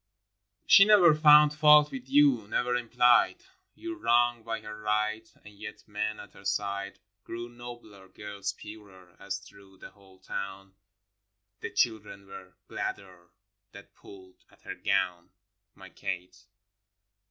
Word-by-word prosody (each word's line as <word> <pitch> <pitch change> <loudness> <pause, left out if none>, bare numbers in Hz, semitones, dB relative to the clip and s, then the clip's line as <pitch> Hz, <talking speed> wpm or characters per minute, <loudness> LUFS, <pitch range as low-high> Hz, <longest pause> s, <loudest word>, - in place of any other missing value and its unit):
25 - - -47
v. - - -48
She 195 - +9
never 200 -6 +6
found 150 -1 +6
fault 150 -1 +5
with 130 -1 -9
you, 135 -6 +3
never 125 +3 -1
implied 120 0 +3 0.4
Your 335 0 -7
wrong 120 - +2
by 115 0 -4
her 105 - -9
right; 110 +1 -2 0.2
and 105 - -13
yet 105 +1 -11
men 105 0 -4
at 105 - -13
her - - -16
side 100 0 -3 0.3
Grew 120 +1 -7
nobler, 120 -5 -12
girls 100 0 -6
purer, 95 -4 -14
as 100 0 -5
through 100 0 -18
the - - -12
whole 95 -1 -21
town 95 +1 -7 0.9
The - - -6
children 110 -4 -2
were 95 -1 -13
gladder 90 -3 -7 0.4
that - - -14
pulled 95 -2 -17
at - - -25
her - - -7
gown 85 -1 -2 0.2
— - - -56
My - - -14
Kate. 90 +3 -7
105 Hz, 145 wpm, -28 LUFS, 100-120 Hz, 0.9 s, She